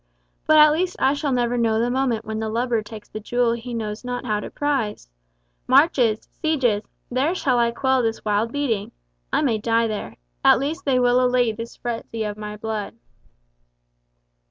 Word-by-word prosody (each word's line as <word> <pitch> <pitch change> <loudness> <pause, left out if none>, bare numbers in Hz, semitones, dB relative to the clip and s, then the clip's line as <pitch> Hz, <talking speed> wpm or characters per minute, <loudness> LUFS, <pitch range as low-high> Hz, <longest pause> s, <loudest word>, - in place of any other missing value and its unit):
but 310 - +6
at 305 0 +8
least 355 +4 0
I 270 - +3
shall 285 -1 -2
never 245 -1 +1
know 225 -1 +2
the 240 +2 +1
moment 250 -4 0
when 220 0 -4
the 220 0 -2
lubber 235 0 0
takes 215 0 -10
the 215 - -7
jewel 240 +2 +1
he 235 +1 -6
knows 215 -1 -4
not 245 0 -4
how 210 -3 0
to - - -6
prize! 270 - -2 0.6
Marches—sieges—there 255 - +1
shall 255 -8 +1
I 235 0 +3
quell 260 +2 +1
this 225 -2 -2
wild 210 +2 +1
beating! 240 -8 -2 0.4
I - - +2
may 230 -6 +1
die 230 +1 +2
there. 215 -2 -4 0.3
At - - +7
least 310 +7 -3
they 270 -3 +2
will 250 0 +3
allay 250 -2 +3
this 230 +2 -8
present 240 -2 -5
frenzy 225 -1 -3
of 210 -1 -3
my 210 0 -7
blood." 215 -1 -4
240 Hz, 180 wpm, -23 LUFS, 220-265 Hz, 0.6 s, at